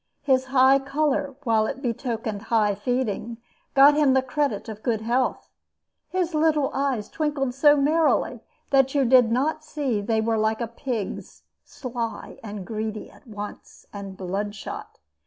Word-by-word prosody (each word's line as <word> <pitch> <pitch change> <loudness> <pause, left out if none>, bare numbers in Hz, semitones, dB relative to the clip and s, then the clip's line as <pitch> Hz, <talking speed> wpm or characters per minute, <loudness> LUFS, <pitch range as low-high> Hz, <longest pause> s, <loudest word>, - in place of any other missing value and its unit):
His 260 -2 +2
high 265 +1 +5
color, 280 0 -1
while 220 -3 +2
it 270 - -4
betokened 230 -4 -3
high 215 -3 +3
feeding, 235 +1 -2 0.4
got 280 +2 +8
him 290 -3 +4
the 265 - +3
credit 260 -5 -1
of 215 -1 -7
good 225 -3 -1
health. 245 +3 -1 0.6
His 360 -2 -1
little 305 -2 +2
eyes 265 -6 -1
twinkled 290 -5 -2
so 290 +3 +5
merrily 305 +3 +2 0.3
that 270 0 +3
you 275 -2 +3
did 245 -2 +5
not 305 +6 0
see 280 -8 -2
they 220 +2 0
were 225 0 +1
like 220 0 +1
a 235 - -1
pig's, 230 -2 -5 0.2
sly 235 -3 -6
and 205 -3 -6
greedy 215 0 -5
at - - -20
once, 210 -2 -9
and 195 -2 -7
bloodshot. 200 +2 -5
250 Hz, 150 wpm, -24 LUFS, 220-275 Hz, 0.6 s, got